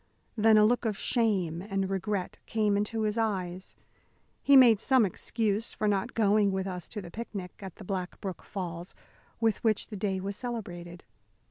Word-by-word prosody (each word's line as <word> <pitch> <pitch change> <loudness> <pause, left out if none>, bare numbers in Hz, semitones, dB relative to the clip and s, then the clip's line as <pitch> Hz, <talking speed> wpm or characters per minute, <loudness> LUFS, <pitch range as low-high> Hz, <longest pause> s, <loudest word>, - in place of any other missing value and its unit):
Then 220 -1 +5
a 210 - +7
look 240 +2 +2
of 215 -3 -1
shame 190 -9 0
and 195 -1 -2
regret 195 0 -3
came 210 -2 +1
into 210 +2 -1
his 215 +1 0
eyes. 190 -4 -2 0.7
He 280 -1 +6
made 235 -5 +7
some 260 -1 +4
excuse 215 +3 -1
for 215 - 0
not 205 +4 0
going 210 -2 +3
with 190 0 -2
us 180 -3 -5
to 210 -3 -6
the 170 - -10
picnic, 200 -5 -6
at 190 -3 -8
the - - -11
Black 185 -1 -4
Brook 190 -3 -5
Falls, 175 -2 -6 0.4
with 225 -2 +1
which 220 -2 +1
the 215 - -6
day 190 -1 -1
was 195 +1 -3
celebrated. 180 -8 -6
205 Hz, 175 wpm, -29 LUFS, 190-220 Hz, 0.7 s, a